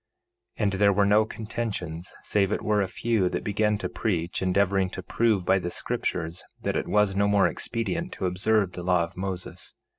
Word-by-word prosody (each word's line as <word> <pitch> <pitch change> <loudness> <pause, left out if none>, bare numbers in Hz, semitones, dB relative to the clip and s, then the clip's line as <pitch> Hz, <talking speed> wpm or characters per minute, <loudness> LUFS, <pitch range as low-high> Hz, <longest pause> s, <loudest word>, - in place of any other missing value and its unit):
1:24 - - -1
And 100 - +3
there 100 -1 +5
were 100 +1 +3
no 105 +2 +4
contentions, 105 -7 -5
save 100 -1 +1
it - - -1
were 105 -1 +2
a 95 - 0
few 105 -1 0
that - - -3
began 105 0 +1
to - - -3
preach, 90 -4 -2
endeavoring 95 0 +2
to - - -7
prove 110 -6 +1
by 95 +2 +4
the 90 - -3
scriptures 85 0 -3 0.2
that - - -2
it - - -1
was 105 -2 +2
no 100 +1 +3
more 100 -1 +4
expedient 170 +10 -2
to - - -3
observe 95 +2 +1
the 90 - -7
law 90 -1 +2
of 85 - -7
Moses. 95 -1 -6
100 Hz, 200 wpm, -26 LUFS, 90-105 Hz, 0.2 s, there